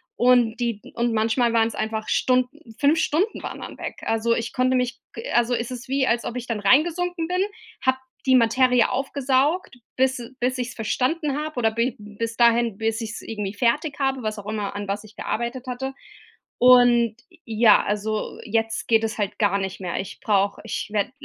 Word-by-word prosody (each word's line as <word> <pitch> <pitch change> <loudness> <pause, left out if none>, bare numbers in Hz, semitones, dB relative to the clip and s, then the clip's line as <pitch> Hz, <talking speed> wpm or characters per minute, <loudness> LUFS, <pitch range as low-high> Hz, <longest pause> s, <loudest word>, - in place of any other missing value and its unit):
und 245 -2 +4
die 230 -4 -1
und 235 0 0
manchmal 230 +2 +2
waren 225 -1 +3
es 230 - -7
einfach 220 0 -3
Stunden, 255 0 0
5 295 +3 +4
Stunden 355 +8 0
waren - - -6
dann - - -8
weg. - - -5
Also, 225 +1 +1
ich 230 0 -3
konnte 255 0 +2
mich 250 +1 -1
ge 230 - -7
also 240 +1 +3
es 235 0 -1
ist 250 0 -8
wie, 270 -1 +1
als 235 0 +1
ob 240 - -4
ich 245 - -6
dann 220 -3 -2
rein 260 +10 +5
gesunken 350 -1 -2
bin, 365 +1 0 0.4
habe 260 -1 +2 0.3
die 260 - +6
Materie 250 +1 +4
aufgesaugt, 270 +4 0 0.2
bis 265 0 +2
e 235 0 -8
bis 255 +1 0
ich 250 0 -2
es - - -9
verstanden 275 - -1
habe 310 -3 -5
oder 225 -2 +3
bi 230 +2 0
bis 210 +2 -5
dahin, 235 -2 +4
bis 225 +1 -1
ich's 225 0 -5
irgendwie 210 -3 -4
fertig 285 +8 0
habe, 270 -2 0
was 215 -1 -3
auch 205 - -10
immer, 210 -2 -3
an 205 0 -4
was 205 +2 -3
ich 215 -1 -16
gearbeitet 240 +3 -3
hatte. 265 +2 -4 0.7
Und 240 -2 +6 0.3
ja, 225 0 +5
also 210 +1 -2
jetzt 225 0 -1
geht 225 -1 +3
es 220 0 -2
halt 205 0 -2
gar 200 -2 +3
nicht 190 0 -4
mehr. 175 -2 -3
Ich 195 - -6
brauche 200 -2 +1
ich 225 - -3
werde 210 +3 0
235 Hz, 200 wpm, -23 LUFS, 220-260 Hz, 0.7 s, die